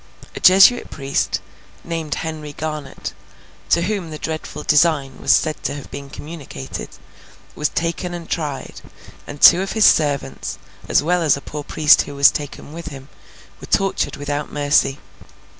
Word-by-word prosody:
A - - -5
Jesuit 195 +6 +6
priest, 140 -1 -2 0.4
named 165 -3 -3
Henry 155 -2 -5
Garnet, 150 -2 -5 0.6
to 170 - +3
whom 195 -3 -2
the 155 - -6
dreadful 155 -1 -5
design 150 -3 +2
was - - +2
said 155 -1 +2
to - - -3
have 145 - -10
been 140 0 -8
communicated, 145 - -8 0.6
was 150 - -1
taken 170 +2 -2
and 170 -2 -8
tried; 150 -5 -4 0.5
and 145 - -8
two 175 - +8
of 195 - -3
his 220 -1 +4
servants, 140 -3 +1 0.3
as - - +3
well 175 +3 +1
as 155 -4 +3
a - - -5
poor 150 +1 -7
priest 150 0 +4
who 145 - -7
was 140 0 +6
taken 145 0 -7
with 170 0 -8
him, 140 -2 -9 0.5
were - - -10
tortured 195 -1 0
without 145 +1 -4
mercy. 145 -1 +2
150 Hz, 160 wpm, -20 LUFS, 145-170 Hz, 0.6 s, two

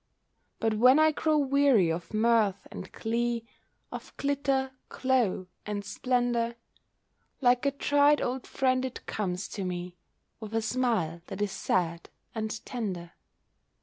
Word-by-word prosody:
But 225 -1 +1
when 250 +5 +6
I 310 0 +5
grow 310 0 +1
weary 275 - +4
of 170 +1 -4
mirth 220 -2 +2
and - - -8
glee, 235 +1 -1 0.5
Of - - -9
glitter, 275 -2 0 0.2
glow, 250 -8 +1 0.2
and 205 -1 -4
splendour, 240 +1 0 0.8
Like 250 +1 +3
a - - +3
tried 290 +1 +3
old 255 +1 -2
friend 255 -1 +1
it 260 -1 -5
comes 190 -2 -2
to 200 - -4
me, 180 -1 -4 0.4
With 220 0 -6
a 225 - +2
smile 220 -9 0
that 195 - -6
is 205 -1 0
sad 170 -3 -1 0.2
and 220 -1 -4
tender. 185 -8 -4
230 Hz, 135 wpm, -29 LUFS, 200-260 Hz, 0.8 s, when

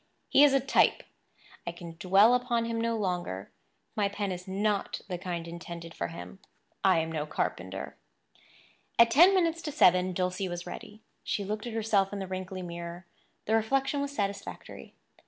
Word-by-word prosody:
He 280 - +6
is 280 -2 +6
a - - +5
type; 270 +1 +3 0.6
I - - 0
can 170 -1 -10
dwell 195 +5 +6
upon 245 -2 +1
him 230 0 -2
no 230 0 0
longer; 175 - -3 0.4
my 205 -2 +1
pen 200 -1 -3
is 180 0 -6
not 200 +1 -1
the 180 -3 -4
kind 175 -2 -4
intended 170 -1 -8
for - - -3
him; 170 +3 -9 0.4
I 190 -3 +5
am 160 0 -1
no 155 -1 -2
carpenter. - - -3 1.0
At 235 0 +7
ten 350 +9 +7
minutes 335 -2 +2
to 300 - -4
seven 185 -8 +4
Dulcie 185 +1 -1
was 175 0 -5
ready. 215 +1 -9 0.2
She 205 - -1
looked 215 +3 -3
at 235 - -5
herself 210 -3 +2
in 205 - -4
the 195 - -3
wrinkly 185 0 -5
mirror. 170 0 -7 0.4
The 220 - 0
reflection 270 +6 +1
was 280 - -2
satisfactory. 200 -6 -5
195 Hz, 175 wpm, -29 LUFS, 180-230 Hz, 1.0 s, At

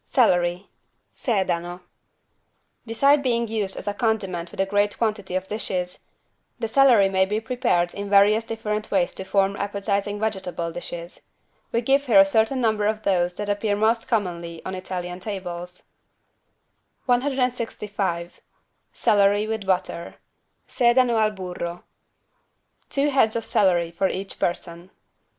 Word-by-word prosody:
CELERY 180 -6 +2 0.5
(Sedano) 180 -5 -1 1.1
Beside 275 +6 +4
being 235 -3 0
used 210 -3 -2
as - - -7
a 205 - 0
condiment 195 -6 -1
with - - -13
a 195 - +3
great 205 +1 0
quantity 210 -5 -2
of 185 0 -2
dishes, 185 -4 -3 0.6
the 225 - -2
celery 240 -5 +5
may 190 -1 +2
be 210 +3 -1
prepared 225 -7 0
in 200 0 -5
various 205 +2 +5
different 220 -2 -4
ways 185 -3 +1
to - - -6
form 195 +1 +1
appetizing 200 0 -2
vegetable 190 -6 -2
dishes. 175 0 -7 0.5
We 235 - +1
give 275 +3 +2
here 215 -5 +6
a 195 - +8
certain 220 +6 +1
number 220 -3 +1
of 215 0 -2
those 180 -3 +1
that 205 +1 -4
appear 205 0 0
most 225 +2 +1
commonly 170 -6 -3
on 190 - -4
Italian 180 -1 -5
tables: 180 -3 -6 1.2
165 235 -9 -1 0.5
CELERY 205 -2 +3
WITH 220 -2 -4
BUTTER 180 -2 -1 0.5
(Sedano 240 -2 +3
al 215 - +3
burro) 180 -3 -6 1.1
Two 285 +1 +1
heads 230 -5 +3
of 230 - -2
celery 175 -4 +2
for 180 +3 0
each 195 +1 -4
person. 170 0 -3
205 Hz, 135 wpm, -24 LUFS, 180-225 Hz, 1.2 s, a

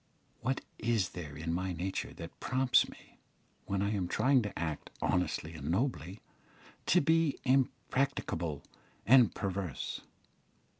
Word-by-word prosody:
What 130 +2 -1 0.2
is 110 -5 +1
there 75 -5 -7
in 80 +2 -2
my 90 +1 -1
nature 90 +3 -3
that 85 -1 -9
prompts 130 -1 +3
me, - - -16 0.5
when 100 0 0
I 100 - +1
am 95 -4 -1
trying 130 +8 +3
to 105 -3 -5
act 80 -2 -3
honestly 90 -2 0
and 75 -2 -5
nobly, 95 - -1 0.7
to 180 - +5
be 160 -1 +3
impracticable 130 - 0 0.4
and 125 0 +6
perverse? 95 - -3
100 Hz, 130 wpm, -32 LUFS, 85-130 Hz, 0.7 s, and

